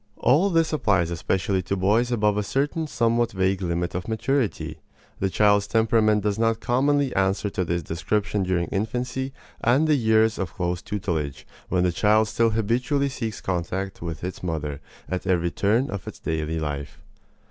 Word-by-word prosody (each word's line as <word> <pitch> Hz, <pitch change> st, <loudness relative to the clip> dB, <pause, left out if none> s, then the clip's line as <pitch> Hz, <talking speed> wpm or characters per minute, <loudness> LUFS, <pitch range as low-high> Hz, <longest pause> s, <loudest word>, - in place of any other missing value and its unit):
All 155 Hz, +10 st, +3 dB
this 165 Hz, -3 st, +2 dB
applies 95 Hz, -, +2 dB
especially 95 Hz, +3 st, 0 dB
to 95 Hz, +2 st, -2 dB
boys 110 Hz, +6 st, +2 dB
above 105 Hz, -3 st, +2 dB
a 105 Hz, -, +1 dB
certain 145 Hz, +9 st, -1 dB
somewhat 115 Hz, -3 st, +1 dB
vague 95 Hz, 0 st, +1 dB
limit 85 Hz, -1 st, -1 dB
of 90 Hz, 0 st, -4 dB
maturity. 110 Hz, -, -1 dB, 0.4 s
The 95 Hz, -, +1 dB
child's 105 Hz, +1 st, +3 dB
temperament 110 Hz, -2 st, +3 dB
does 105 Hz, 0 st, 0 dB
not 115 Hz, 0 st, +2 dB
commonly 140 Hz, +3 st, +1 dB
answer 95 Hz, +1 st, +1 dB
to 95 Hz, -, -1 dB
this 85 Hz, -1 st, -2 dB
description 100 Hz, +6 st, -1 dB
during 90 Hz, -2 st, 0 dB
infancy 125 Hz, +6 st, -2 dB, 0.3 s
and 130 Hz, +7 st, +4 dB
the 155 Hz, -, +4 dB
years 110 Hz, -4 st, +3 dB
of 95 Hz, -4 st, -4 dB
close 90 Hz, -1 st, -2 dB
tutelage, 85 Hz, -9 st, -3 dB, 0.2 s
when 90 Hz, -1 st, +2 dB
the 90 Hz, -, +2 dB
child 105 Hz, +4 st, +3 dB
still 115 Hz, +2 st, +2 dB
habitually 125 Hz, +6 st, 0 dB
seeks 115 Hz, -5 st, -5 dB
contact 95 Hz, +2 st, -3 dB
with 85 Hz, -1 st, -5 dB
its 90 Hz, +1 st, -5 dB
mother 75 Hz, -4 st, -3 dB, 0.3 s
at 95 Hz, +1 st, -4 dB
every 85 Hz, -2 st, +1 dB
turn 110 Hz, -, +1 dB
of 100 Hz, -3 st, -6 dB
its -, -, -7 dB
daily 80 Hz, 0 st, -2 dB
life. 75 Hz, -2 st, -4 dB
100 Hz, 170 wpm, -24 LUFS, 90-115 Hz, 0.4 s, and